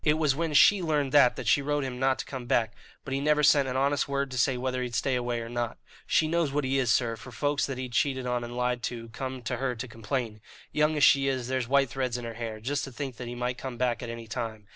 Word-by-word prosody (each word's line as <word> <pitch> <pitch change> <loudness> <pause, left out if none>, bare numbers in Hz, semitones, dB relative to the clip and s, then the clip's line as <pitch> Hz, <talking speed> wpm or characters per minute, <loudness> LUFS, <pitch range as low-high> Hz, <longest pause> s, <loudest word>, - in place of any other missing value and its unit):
It 150 0 +3
was 150 -4 +2
when 160 +1 -2
she 200 +6 +7
learned 150 -5 0
that 140 -4 +6
that - - -6
she 145 - +4
wrote 145 +1 0
to - - -2
him 125 -1 -5
not 130 0 +2
to - - -5
come 130 -3 -7
back; 110 -3 +1 0.3
but 135 - -4
he 135 - 0
never 150 +1 +2
sent 145 -2 +5
an 130 0 -2
honest 140 +3 +1
word 140 -1 -1
to 125 - -4
say 130 0 +2
whether 130 0 -2
he'd 120 -2 -4
stay 135 - +1
away 120 -1 -1
or 115 - -6
not. 120 -1 -3 0.3
She 155 - +3
knows 165 -2 +1
what 145 +1 0
he 135 +1 +1
is, 125 -3 +1
sir, 115 +1 +2
for 120 +3 -11
folks 145 +5 0
that 135 -2 -4
he'd 130 -1 -5
cheated 130 +1 0
and 120 -1 -3
lied 125 0 0
to 115 -1 -5
come 130 +2 -6
to 115 - -2
her 130 -2 -1
to 125 +2 -6
complain. 115 -1 -4 0.3
Young 150 +1 +2
as 145 - +2
she 135 -1 +6
is, 130 -2 -1
there's 130 -2 -1
white 135 -1 +3
threads 130 -2 -2
in 120 - -6
her 115 - -5
hair, 115 -1 -5
just 140 +6 -2
to 135 - -9
think 130 -1 -6
that 125 - -6
he 120 - -5
might 125 0 -3
come 130 -3 -6
back 120 -2 0
at 120 - -5
any 115 0 -6
time. 110 -2 -5
130 Hz, 285 wpm, -28 LUFS, 120-140 Hz, 0.3 s, she